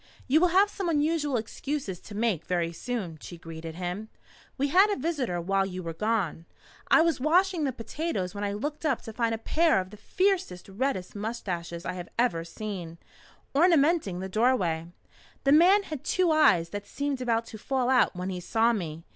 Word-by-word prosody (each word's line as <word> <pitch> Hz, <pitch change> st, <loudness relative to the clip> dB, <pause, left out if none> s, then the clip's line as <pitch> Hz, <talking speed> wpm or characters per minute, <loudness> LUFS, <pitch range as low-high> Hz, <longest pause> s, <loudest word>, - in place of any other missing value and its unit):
"You 305 Hz, +5 st, +4 dB
will 360 Hz, -, +6 dB
have 390 Hz, +4 st, +4 dB
some 385 Hz, -4 st, -3 dB
unusual 295 Hz, -3 st, +1 dB
excuses 225 Hz, -, -4 dB
to 205 Hz, -, -11 dB
make 215 Hz, -7 st, 0 dB
very 170 Hz, -2 st, -1 dB
soon," 185 Hz, -6 st, -4 dB
she 175 Hz, -, -9 dB
greeted 165 Hz, -1 st, -8 dB
him. 180 Hz, +5 st, -4 dB, 0.5 s
"We 280 Hz, +1 st, 0 dB
had 380 Hz, +7 st, +6 dB
a 410 Hz, -, +1 dB
visitor 265 Hz, -, -2 dB
while 195 Hz, +3 st, +1 dB
you 185 Hz, -1 st, -5 dB
were 165 Hz, -1 st, -4 dB
gone. 195 Hz, -4 st, -1 dB, 0.4 s
I 325 Hz, -, +6 dB
was 335 Hz, -4 st, +1 dB
washing 340 Hz, +3 st, +2 dB
the 270 Hz, -, 0 dB
potatoes 230 Hz, -, -3 dB
when 205 Hz, 0 st, -5 dB
I 200 Hz, -, -1 dB
looked 295 Hz, +10 st, -4 dB
up 290 Hz, -6 st, 0 dB
to 225 Hz, -, -8 dB
find 230 Hz, -1 st, 0 dB
a -, -, -5 dB
pair 315 Hz, -, +2 dB
of 185 Hz, 0 st, -5 dB
the 210 Hz, -, -11 dB
fiercest, 365 Hz, -, -1 dB
reddest 200 Hz, -2 st, -2 dB
moustaches 180 Hz, -6 st, -4 dB
I 180 Hz, -, -2 dB
have 175 Hz, -1 st, -7 dB
ever 205 Hz, -9 st, +1 dB
seen, 175 Hz, -2 st, -6 dB, 0.6 s
ornamenting 295 Hz, -, +3 dB
the 190 Hz, -, -4 dB
doorway. 190 Hz, -7 st, +1 dB, 0.6 s
The 275 Hz, -, +3 dB
man 365 Hz, +7 st, +6 dB
had 305 Hz, -8 st, -7 dB
two 365 Hz, -3 st, +2 dB
eyes 180 Hz, -, +4 dB
that 205 Hz, +1 st, -6 dB
seemed 285 Hz, -2 st, -3 dB
about 230 Hz, -2 st, 0 dB
to 220 Hz, -1 st, -10 dB
fall 260 Hz, +1 st, -1 dB
out 255 Hz, -6 st, +3 dB
when 180 Hz, +1 st, -3 dB
he 180 Hz, -, -4 dB
saw 225 Hz, +6 st, +2 dB
me. 165 Hz, -6 st, -4 dB
225 Hz, 190 wpm, -27 LUFS, 180-295 Hz, 0.6 s, will